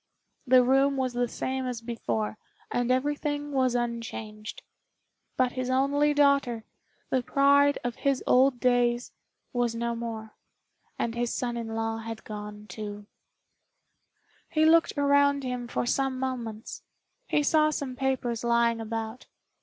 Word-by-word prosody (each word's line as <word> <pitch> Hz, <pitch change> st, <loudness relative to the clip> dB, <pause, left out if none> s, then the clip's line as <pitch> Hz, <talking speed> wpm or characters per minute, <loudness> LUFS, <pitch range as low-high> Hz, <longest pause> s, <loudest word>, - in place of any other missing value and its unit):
The 255 Hz, 0 st, +7 dB
room 270 Hz, +2 st, +3 dB
was 255 Hz, -2 st, -1 dB
the 245 Hz, 0 st, 0 dB
same 260 Hz, +2 st, -3 dB
as 245 Hz, -2 st, -3 dB
before, 115 Hz, -, -3 dB, 0.3 s
and 245 Hz, 0 st, 0 dB
everything 290 Hz, +2 st, 0 dB
was 260 Hz, -3 st, +1 dB
unchanged; 225 Hz, -3 st, -4 dB, 0.7 s
but 255 Hz, -1 st, +2 dB
his 255 Hz, 0 st, -3 dB
only 280 Hz, +3 st, +2 dB
daughter, 280 Hz, -6 st, +3 dB, 0.5 s
the 260 Hz, -, +2 dB
pride 280 Hz, +2 st, +4 dB
of 245 Hz, -1 st, -3 dB
his 275 Hz, -2 st, 0 dB
old 255 Hz, 0 st, +4 dB
days, 245 Hz, -1 st, +2 dB, 0.4 s
was 240 Hz, -2 st, 0 dB
no 235 Hz, 0 st, -1 dB
more, 225 Hz, -2 st, -6 dB, 0.6 s
and 230 Hz, -, -1 dB
his 235 Hz, 0 st, -1 dB
son 240 Hz, -1 st, -2 dB
in 230 Hz, -1 st, -4 dB
law 225 Hz, 0 st, -2 dB
had 225 Hz, 0 st, -7 dB
gone 210 Hz, 0 st, -8 dB
too. 205 Hz, +1 st, -7 dB, 1.4 s
He 310 Hz, -1 st, +3 dB
looked 325 Hz, -1 st, +4 dB
around 285 Hz, 0 st, +3 dB
him 250 Hz, -1 st, -3 dB
for 240 Hz, -, -2 dB
some 265 Hz, +1 st, 0 dB
moments. 240 Hz, -4 st, -4 dB, 0.5 s
He 295 Hz, -, +2 dB
saw 305 Hz, +1 st, +4 dB
some 280 Hz, -4 st, -3 dB
papers 250 Hz, -3 st, -1 dB
lying 235 Hz, -1 st, +2 dB
about. 225 Hz, +2 st, -5 dB
245 Hz, 140 wpm, -28 LUFS, 230-275 Hz, 1.4 s, The